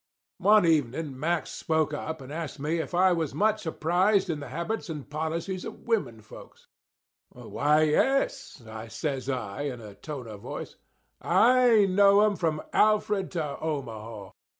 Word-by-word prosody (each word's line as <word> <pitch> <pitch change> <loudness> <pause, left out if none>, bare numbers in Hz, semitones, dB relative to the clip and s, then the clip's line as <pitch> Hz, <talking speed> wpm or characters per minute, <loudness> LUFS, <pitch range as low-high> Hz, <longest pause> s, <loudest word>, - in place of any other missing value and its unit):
One 210 -2 +5
evening 145 -3 0
Mack 165 +2 0
spoke 160 -1 -1
up 160 0 -5
and 135 +2 -9
asked 160 -2 -5
me 155 +4 -1
if 160 +2 -4
I 185 +1 +5
was 160 -4 -2
much 215 -3 +1
apprised 180 +5 +2
in 155 - -3
the 145 - -7
habits 170 - -4
and 150 -4 -6
policies 160 +5 -3
of - - -8
women 210 - -1
folks. - - -14 0.6
"Why, 150 +2 +1
yes," 270 - +1 0.3
says 135 0 -3
I, 125 -2 -3
in 135 -4 -4
a 105 -3 -10
tone 140 +3 -7
of 105 -2 -9
voice; - - -7 0.5
"I 240 -3 +5
know 200 +1 +5
'em 210 -1 +3
from 160 -4 -1
Alfred 210 -2 +2
to 155 -5 -3
Omaha. 115 -9 -5
160 Hz, 150 wpm, -27 LUFS, 140-195 Hz, 0.6 s, One